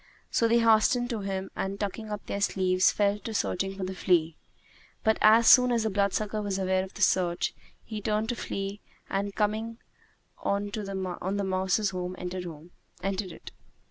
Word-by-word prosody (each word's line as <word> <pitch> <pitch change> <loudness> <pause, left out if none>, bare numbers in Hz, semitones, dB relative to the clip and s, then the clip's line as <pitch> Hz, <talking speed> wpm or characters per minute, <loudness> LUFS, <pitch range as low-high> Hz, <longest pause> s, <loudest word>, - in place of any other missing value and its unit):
So 230 - +3
they 230 +1 +4
hastened 235 +2 +3
to 230 - -2
him 195 -1 -4
and, 195 +1 -3
tucking 215 +2 -4
up 210 -1 -5
their 200 - -3
sleeves, 185 -2 +3
fell 205 0 +1
to 220 +1 -6
searching 195 0 -1
for 195 - -4
the 185 0 -3
flea; 170 -4 +2 0.7
but 220 -1 +2
as 225 +2 +6
soon 250 +1 +7
as 230 -2 +2
the 220 - 0
bloodsucker 205 +2 0
was 200 -2 -2
aware 185 -1 +1
of 190 - -10
the 210 - 0
search, 175 -2 +2 0.3
he 215 -2 -6
turned 215 +1 0
to 240 - 0
flee 195 -2 -4 0.3
and 200 +1 -2
coming 220 +2 -1 0.6
on 200 +1 -1
the 195 -1 -3
mouse's 190 +2 +1
home, 180 0 -4
entered 180 0 -5 0.8
it. 160 - -11
200 Hz, 170 wpm, -28 LUFS, 190-215 Hz, 0.8 s, soon